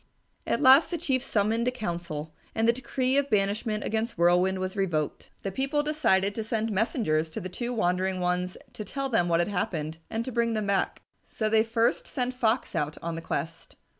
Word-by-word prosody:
At - - +1
last 265 +4 +8
the 345 - -2
Chief 270 -6 0
summoned 225 0 0
a - - +3
council, 170 -9 -5 0.2
and 225 0 +2
the 235 - +5
decree 260 +1 0
of 280 0 +1
banishment 210 +1 0
against 225 0 -2
Whirlwind 180 +2 +3
was 185 +1 -3
revoked. 170 -7 -1
The 195 - -2
people 275 +7 0
decided 205 -11 +2
to 220 - -3
send 225 0 -1
messengers 190 - +1
to - - -5
the 185 - -6
two 240 +6 -3
wandering 185 -3 0
ones 180 0 -1 0.2
to 215 - -6
tell 275 +6 -3
them 175 -8 +2
what 170 0 +3
had 175 - -1
happened 165 -5 -2
and 225 +1 -2
to 260 - -4
bring 235 -1 +1
them 215 -1 -1
back. 200 -1 0 0.2
So 215 -1 -2
they 220 0 +4
first 230 +1 +1
sent 255 -3 -2
Fox 240 -1 0
out 150 +1 -1
on 170 0 -2
the 165 - -5
quest. 165 0 -5
215 Hz, 200 wpm, -27 LUFS, 180-240 Hz, 0.2 s, last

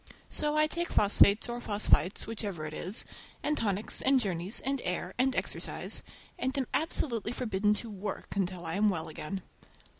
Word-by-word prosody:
So 300 0 +1
I 305 - +5
take 340 +2 -1
phosphates 205 +1 +5
or 240 0 -4
phosphites—whichever 205 -3 +1
it 155 - -6
is, 185 +8 -1 0.4
and 300 - +1
tonics, 210 -4 0
and 270 0 +4
journeys, 190 -2 0
and 270 -1 -1
air, 180 +1 -2
and 265 +1 +3
exercise, - - -1 0.4
and 265 -1 -1
am 270 - +1
absolutely 245 -8 0
forbidden 210 -4 +1
to 230 +2 -5
"work" 200 0 -5
until 180 -3 -1
I 165 - -3
am 210 +1 +4
well 160 -5 -2
again. 175 +4 -5
210 Hz, 160 wpm, -31 LUFS, 190-255 Hz, 0.4 s, I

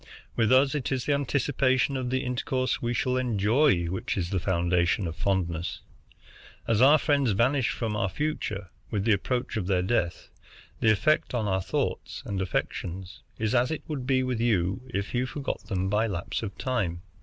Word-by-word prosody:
With 115 -1 +2
us, 135 +2 +5
it 145 -4 -2
is 130 -2 -1
the 145 - +2
anticipation 135 -1 +1
of 130 -2 -2
the 130 +1 0
intercourse 130 +1 -1
we 120 - -1
shall 125 +2 0
enjoy 115 - +3
which 90 +4 -3
is 90 -1 -2
the 95 - +1
foundation 90 +1 +1
of 80 -1 -4
fondness. 85 -2 -1 0.9
As 115 -1 +2
our 145 +4 +8
friends 140 -7 +2
vanish 130 +5 +2
from 110 -3 -2
our 95 -2 0
future 105 - -3 0.2
with 105 -2 -1
the 115 - +4
approach 120 +4 0
of 95 -4 -2
their 90 -2 +2
death, 90 -4 -1 0.5
the - - +3
effect 120 +6 +2
on 110 -3 0
our 95 -1 +1
thoughts - - -3
and 100 -2 -2
affections 90 0 -3 0.2
is 110 +1 -1
as 125 +1 +3
it 160 - -3
would 140 -6 -4
be 130 -1 +3
with 125 -3 -1
you 100 -2 +1
if 100 -2 -3
you 125 +1 0
forgot 140 -5 -4
them 95 -3 -1
by 105 +3 +2
lapse 90 -5 -3
of 105 -3 -6
time. 95 -10 -2
115 Hz, 185 wpm, -27 LUFS, 95-130 Hz, 0.9 s, our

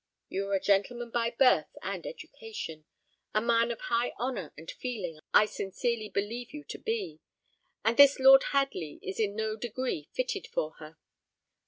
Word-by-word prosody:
You 195 +1 -2
are 200 - +1
a - - +2
gentleman 230 +5 +1
by 235 0 +1
birth 255 +2 +4
and - - -4
education; 445 - -8 0.5
a - - +5
man 230 +1 +3
of 235 - -4
high 235 +1 0
honour 240 - -3
and 160 +2 -8
feeling 195 -11 -5
I 210 - +7
sincerely 215 +2 -2
believe 230 +7 -3
you 295 - -7
to - - -6
be, 445 -3 -3 0.7
and 230 +1 +2
this 280 -1 +8
Lord 270 +1 +8
Hadley 275 - -1
is 190 - -5
in 205 -2 0
no 220 0 -1
degree 235 - -3
fitted 475 -5 -2
for 155 - -2
her. 155 0 -11
230 Hz, 165 wpm, -30 LUFS, 200-260 Hz, 0.7 s, this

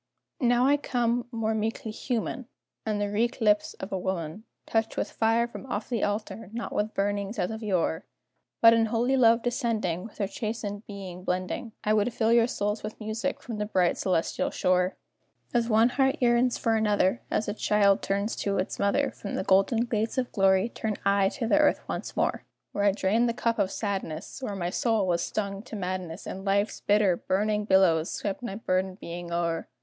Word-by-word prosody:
Now 245 -1 +3
I 285 +2 +4
come 240 -3 0
more 225 -2 -1
meekly 220 0 -2
human, 240 +2 -3 0.4
And 210 -1 0
the 205 0 -1
wreak 230 +5 0
lips 210 -2 +2
of 190 - -7
a 190 - -1
woman 180 +2 -4 0.2
Touch 225 0 -1
with - - -1
fire 230 +1 +2
from 240 - -9
off 210 -4 -4
the 235 -4 -1
altar, 205 0 -3
not 235 0 -4
with 215 +1 -1
burnings 200 +2 -1
as 180 +1 -1
of 220 0 -6
yore; 185 -4 -1 0.5
But 230 0 +9
in 225 -1 +3
holy 240 +4 +1
love 230 -2 +5
descending, 225 - -1
With 225 - -11
her 205 - 0
chastened 210 0 -5
being 190 -3 -8
blending, 185 +5 -3
I 215 - +2
would 215 +3 +2
fill 225 0 +3
your 235 0 +5
souls 210 -2 -2
with 215 +1 -7
music 220 +5 -3
from 230 -4 -5
the 210 - 0
bright 185 -4 +2
celestial 180 -4 0
shore. 180 0 +1 0.6
As 235 -1 +1
one 225 +2 +5
heart 265 +1 +2
yearns 240 0 +3
for 225 -1 +1
another, 210 0 +2
As 215 - 0
a 205 - -1
child 205 -2 +3
turns 200 +3 -1
to 200 -1 -1
its 185 - -2
mother, 240 +8 +2
From 200 - -6
the - - -1
golden 195 +5 +3
gates 225 +1 -1
of 250 -1 -1
glory 190 +1 +3
turn 220 -2 -3
I 200 -1 +4
to 250 +1 -4
the 295 +7 +3
earth 300 - +2
once - - -5
more, - - 0 0.3
Where 205 - 0
I 200 - +6
drained 215 +4 +1
the 230 - -2
cup 230 -1 0
of 190 - +2
sadness, 195 - -4
Where 210 -6 -3
my 175 -2 -2
soul 225 -3 +1
was 170 -2 +1
stung 200 -1 -3
to 225 0 -9
madness, 185 -2 -4
And 190 - -6
life's 200 +2 0
bitter, 205 -3 +3
burning 210 +2 0
billows 185 -5 +4
swept 200 +1 -3
my 235 -5 -4
burdened 185 -2 -1
being 170 0 -7
o'er. 170 -1 -1
210 Hz, 195 wpm, -27 LUFS, 195-230 Hz, 0.6 s, But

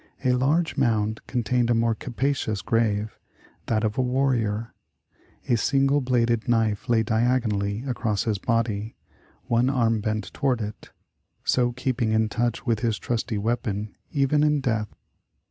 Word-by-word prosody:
A. 125 - +4
larger 140 +4 +1
mound 110 -3 +1
contained 125 -1 0
a 120 - +3
more 115 0 +2
capacious 120 -4 -2
grave 110 -1 0 0.2
— - - -30
that 110 -1 +1
of 110 +2 -1
a - - +5
warrior. 125 -4 0 0.7
A 120 - +3
single 135 +4 +2
bladed 120 -2 +1
knife 110 -3 +1
lay 115 -2 +4
diagonally 110 -2 0
across 115 -6 -1
his 105 -4 -1
body, 115 -2 -1 0.5
one 120 +2 +2
arm 115 -5 +1
bent 110 -2 -3
toward 130 -4 0
it, 105 -1 -6 0.3
— - - -48
so 120 -1 +2
keeping 125 -3 -1
in 110 0 +2
touch 120 +3 -1
with 115 -4 +1
his 115 -2 0
trusty 115 -1 -2
weapon, 105 -1 -2 0.2
even 140 +1 +2
in 150 -1 +3
death. 110 -6 -1
115 Hz, 150 wpm, -25 LUFS, 110-125 Hz, 0.7 s, a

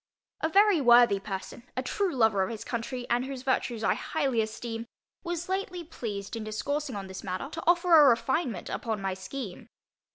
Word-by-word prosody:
A 320 - +1
very 400 -1 +5
worthy 240 -5 +6
person, 195 +3 -6 0.2
a 255 - 0
true 385 +8 0
lover 220 -5 +3
of 190 - 0
his 225 -2 -6
country, 245 +1 -4
and 240 +1 +1
whose 265 -1 -6
virtues 245 -4 0
I - - +3
highly 270 -7 0
esteem, 225 +1 -5 0.4
was 345 -1 -3
lately 375 -2 -3
pleased 215 -10 -6
in 225 - -4
discoursing 275 +6 -3
on 200 -1 -5
this 190 0 -8
matter, 185 +8 -4
to 325 - -6
offer 345 0 +5
a 295 -3 +9
refinement 245 - 0
upon 220 -3 -3
my 195 -1 -2
scheme. 190 +2 -7
245 Hz, 185 wpm, -28 LUFS, 215-305 Hz, 0.4 s, a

